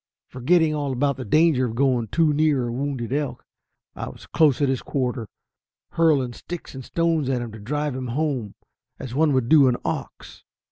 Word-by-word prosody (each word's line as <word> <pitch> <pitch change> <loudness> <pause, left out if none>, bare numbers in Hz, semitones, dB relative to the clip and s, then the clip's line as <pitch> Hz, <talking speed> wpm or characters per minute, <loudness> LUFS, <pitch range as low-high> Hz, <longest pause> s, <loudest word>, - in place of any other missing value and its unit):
Forgetting 155 +5 +2
all 145 -3 -2
about 140 +2 0
the 130 - -5
danger 150 +2 +3
of 115 - -6
going 125 -3 +1
too 160 +4 +2
near 145 -4 +2
a - - -3
wounded 130 -2 -3
elk, 145 -1 -3 0.5
I - - -5
was - - -13
close 150 -5 +3
at 145 - +2
his 130 -1 0
quarter, 125 -4 -2 0.6
hurling 145 -7 +2
sticks 175 +7 -8
and 130 -1 -8
stones 165 -2 0
at 130 -2 0
him 115 - -7
to 110 - -10
drive 145 +5 -2
him 130 -1 -4
home, 130 -5 -2 0.4
as 125 - -7
one 150 +2 +3
would 130 +1 +2
an 135 -5 +6
ox. - - -5
135 Hz, 185 wpm, -23 LUFS, 125-150 Hz, 0.6 s, an